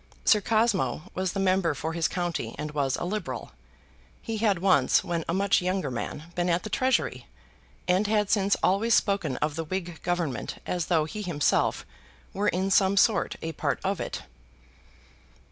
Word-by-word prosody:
Sir 210 Hz, -, +5 dB
Cosmo 210 Hz, -, +1 dB
was 185 Hz, -1 st, -2 dB
the 195 Hz, -, -2 dB
member 185 Hz, -4 st, +2 dB
for 160 Hz, +3 st, -3 dB
his 165 Hz, -1 st, +1 dB
county, 170 Hz, -10 st, -3 dB
and 150 Hz, +1 st, -4 dB
was 140 Hz, -3 st, 0 dB
a -, -, -4 dB
Liberal. 195 Hz, -1 st, -4 dB, 0.7 s
He 225 Hz, -2 st, -4 dB
had 210 Hz, -3 st, +2 dB
once, 170 Hz, -8 st, +3 dB
when 170 Hz, -1 st, -2 dB
a -, -, +1 dB
much 200 Hz, -1 st, +3 dB
younger 180 Hz, -6 st, -1 dB
man, 150 Hz, +7 st, -5 dB
been 175 Hz, 0 st, 0 dB
at 175 Hz, +1 st, +1 dB
the 215 Hz, -, -6 dB
Treasury, 260 Hz, +4 st, 0 dB, 0.6 s
and 185 Hz, +3 st, +2 dB
had 210 Hz, -1 st, +1 dB
since 200 Hz, -1 st, +3 dB
always 215 Hz, +5 st, +3 dB
spoken 195 Hz, -10 st, +1 dB
of 150 Hz, -1 st, -4 dB
the 165 Hz, -, -2 dB
Whig 175 Hz, 0 st, -5 dB
Government 175 Hz, -6 st, -2 dB
as 175 Hz, -3 st, -2 dB
though 160 Hz, -4 st, +2 dB
he 210 Hz, +7 st, -6 dB
himself 170 Hz, -7 st, +1 dB, 0.5 s
were 200 Hz, +2 st, -1 dB
in 190 Hz, +2 st, 0 dB
some 195 Hz, 0 st, +4 dB
sort 210 Hz, +1 st, +3 dB
a 165 Hz, -, -2 dB
part 145 Hz, -3 st, -2 dB
of 195 Hz, -2 st, -1 dB
it. -, -, -5 dB
180 Hz, 175 wpm, -27 LUFS, 160-200 Hz, 0.7 s, Sir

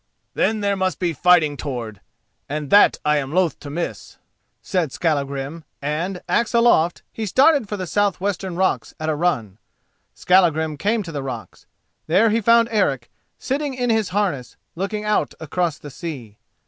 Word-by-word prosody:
"Then 220 Hz, -1 st, +1 dB
there 200 Hz, -1 st, +1 dB
must 190 Hz, -1 st, -1 dB
be 175 Hz, -2 st, -1 dB
fighting 160 Hz, -1 st, +4 dB
toward, 120 Hz, -8 st, -6 dB, 0.5 s
and 150 Hz, -1 st, -4 dB
that 205 Hz, -, +6 dB
I 150 Hz, 0 st, +3 dB
am 135 Hz, -1 st, -3 dB
loth 180 Hz, -1 st, +1 dB
to 145 Hz, -, -9 dB
miss," 170 Hz, +4 st, -5 dB, 0.4 s
said 175 Hz, -7 st, -1 dB
Skallagrim, 140 Hz, 0 st, -2 dB, 0.2 s
and, 165 Hz, +6 st, -3 dB
axe 235 Hz, 0 st, +1 dB
aloft, 235 Hz, -8 st, +3 dB
he 220 Hz, -1 st, -4 dB
started 270 Hz, -, +4 dB
for 210 Hz, -, -3 dB
the 185 Hz, -, -4 dB
south 205 Hz, +1 st, 0 dB
western 190 Hz, -2 st, -3 dB
rocks 190 Hz, +1 st, 0 dB
at 155 Hz, 0 st, -2 dB
a 155 Hz, -, +1 dB
run. 120 Hz, -, -1 dB, 0.6 s
Skallagrim 160 Hz, -4 st, +3 dB
came 210 Hz, +6 st, 0 dB
to 170 Hz, -, -8 dB
the 145 Hz, -3 st, -4 dB
rocks. 135 Hz, -1 st, -8 dB, 0.4 s
There 195 Hz, +7 st, +4 dB
he 225 Hz, +2 st, +1 dB
found 230 Hz, +2 st, +5 dB
Eric, 140 Hz, -, 0 dB, 0.3 s
sitting 280 Hz, 0 st, -2 dB
in 245 Hz, -2 st, 0 dB
his 220 Hz, -4 st, +1 dB
harness, 180 Hz, -11 st, -2 dB, 0.2 s
looking 210 Hz, +4 st, -3 dB
out 210 Hz, 0 st, 0 dB
across 165 Hz, 0 st, -2 dB
the 145 Hz, -, -10 dB
sea. 125 Hz, -, -8 dB
175 Hz, 165 wpm, -21 LUFS, 150-205 Hz, 0.6 s, that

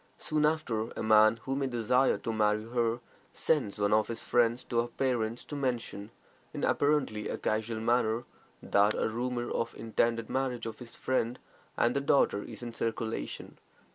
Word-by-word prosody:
Soon 150 Hz, -1 st, +1 dB
after, 120 Hz, -8 st, -1 dB
a -, -, -3 dB
man 110 Hz, +1 st, +6 dB
who 135 Hz, -, -2 dB
may 135 Hz, -1 st, 0 dB
desire 125 Hz, +2 st, +2 dB
to 115 Hz, -, -4 dB
marry 105 Hz, 0 st, +2 dB
her 120 Hz, 0 st, 0 dB, 0.3 s
sends 145 Hz, -11 st, 0 dB
one 100 Hz, 0 st, +2 dB
of 110 Hz, 0 st, +3 dB
his 115 Hz, -1 st, -4 dB
friends 120 Hz, 0 st, +2 dB
to 120 Hz, -, -1 dB
her 120 Hz, -, -3 dB
parents 120 Hz, -2 st, -1 dB
to 145 Hz, -, -7 dB
mention, 120 Hz, -6 st, -3 dB, 0.5 s
in -, -, -4 dB
apparently 145 Hz, -8 st, +1 dB
a -, -, -2 dB
casual 110 Hz, +1 st, -1 dB
manner, 115 Hz, 0 st, +1 dB, 0.4 s
that 100 Hz, +1 st, +3 dB
a -, -, 0 dB
rumor 120 Hz, +2 st, -2 dB
of 115 Hz, -, -1 dB
the -, -, -14 dB
intended 115 Hz, 0 st, 0 dB
marriage 130 Hz, -2 st, -2 dB
of 115 Hz, -, -6 dB
his 120 Hz, -2 st, -11 dB
friend 125 Hz, -1 st, -1 dB, 0.4 s
and 120 Hz, -, +3 dB
their 140 Hz, -, +1 dB
daughter 140 Hz, -7 st, +3 dB
is -, -, -9 dB
in 120 Hz, -1 st, -6 dB
circulation. 110 Hz, -, -4 dB
115 Hz, 175 wpm, -30 LUFS, 110-125 Hz, 0.5 s, man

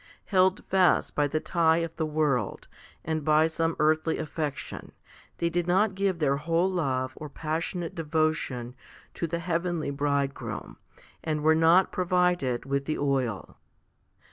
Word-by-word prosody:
Held 190 Hz, 0 st, +2 dB
fast 185 Hz, -2 st, +3 dB
by 145 Hz, -1 st, +2 dB
the 155 Hz, +2 st, -1 dB
tie 165 Hz, -1 st, +2 dB
of 165 Hz, -1 st, -3 dB
the 160 Hz, -, -1 dB
world, 150 Hz, -8 st, -1 dB, 0.4 s
and 160 Hz, -1 st, -2 dB
by 155 Hz, +1 st, +4 dB
some 165 Hz, 0 st, -1 dB
earthly 155 Hz, +1 st, +2 dB
affection, 150 Hz, -2 st, -5 dB, 0.4 s
they 170 Hz, -, 0 dB
did 175 Hz, 0 st, -1 dB
not 195 Hz, +3 st, +3 dB
give 190 Hz, -2 st, 0 dB
their 140 Hz, -3 st, +1 dB
whole 170 Hz, +5 st, +1 dB
love 130 Hz, -7 st, -1 dB
or 150 Hz, -, -8 dB
passionate 165 Hz, +3 st, -3 dB
devotion 155 Hz, -6 st, -1 dB, 0.4 s
to 170 Hz, -, -3 dB
the 170 Hz, +1 st, -2 dB
heavenly 170 Hz, -3 st, -2 dB
Bride 140 Hz, -1 st, 0 dB
groom, -, -, -7 dB, 0.5 s
and 155 Hz, -1 st, -2 dB
were 160 Hz, +1 st, +5 dB
not 165 Hz, +4 st, +4 dB
provided 180 Hz, -9 st, +1 dB
with 140 Hz, 0 st, -1 dB
the 155 Hz, -, -2 dB
oil. 130 Hz, -7 st, -1 dB
160 Hz, 145 wpm, -27 LUFS, 145-170 Hz, 0.5 s, were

